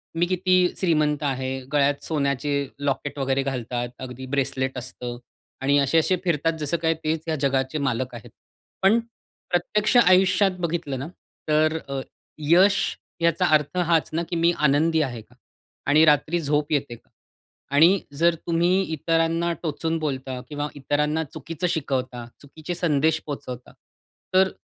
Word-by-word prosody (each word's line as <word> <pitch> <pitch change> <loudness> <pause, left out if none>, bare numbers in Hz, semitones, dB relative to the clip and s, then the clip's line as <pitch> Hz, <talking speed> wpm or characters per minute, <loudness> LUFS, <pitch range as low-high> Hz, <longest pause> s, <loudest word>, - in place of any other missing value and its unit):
मी 170 +1 +2
किती 185 0 +1 0.2
श्रीमंत 150 -5 +1
आहे. 130 -1 -2
गळ्यात 145 0 +2
सोन्याचे 140 -1 0
लॉकेट 145 0 -2
वगैरे 135 0 0
घालतात. 120 -2 -3
अगदी 130 0 -7
ब्रेसलेट 130 -1 -1
असतं. 125 -1 -6 0.4
आणि 140 +2 +3
असे-असे 160 +6 +3
फिरतात 165 -2 +1
जसं 150 +3 -1
काय 165 0 +1
तेच 155 0 0
या 160 - 0
जगाचे 135 +1 0
मालक 125 +1 -2
आहेत. 115 - -10 0.5
पण 205 +5 +5 0.5
प्रत्यक्ष 210 +6 +1
आयुष्यात 185 -2 +5
बघितलं 165 -6 -2
ना 135 - -5 0.4
तर 155 +1 +3
अ, 135 -1 -2 0.4
यश 180 +7 +5 0.4
याचा 170 +2 +2
अर्थ 150 +4 -1
हाच 170 -4 +2
ना, 170 +2 0
की 170 - -5
मी 170 +1 +3 0.2
आनंदी 160 +3 +2
आहे 125 -6 -3
का? 125 - -23 0.5
आणि 150 +3 +5
रात्री 150 +3 +3
झोप 150 0 0
येते 140 -5 -1
का? - - -23 0.7
आणि 175 +6 +6 0.2
जर 170 +1 +3
तुम्ही 175 +3 +2
इतरांना 165 +2 +1
टोचून 160 +1 -1
बोलता 130 -4 -3
किंवा 145 0 -3
इतरांना 150 +3 0
चुकीचं 165 +4 -5
शिकवता, 130 -6 -2 0.2
चुकीचे 155 +4 -7
संदेश 160 -2 +2
पोहचवता 130 -4 -7 0.6
तर 190 0 +4
150 Hz, 140 wpm, -24 LUFS, 135-170 Hz, 0.7 s, आणि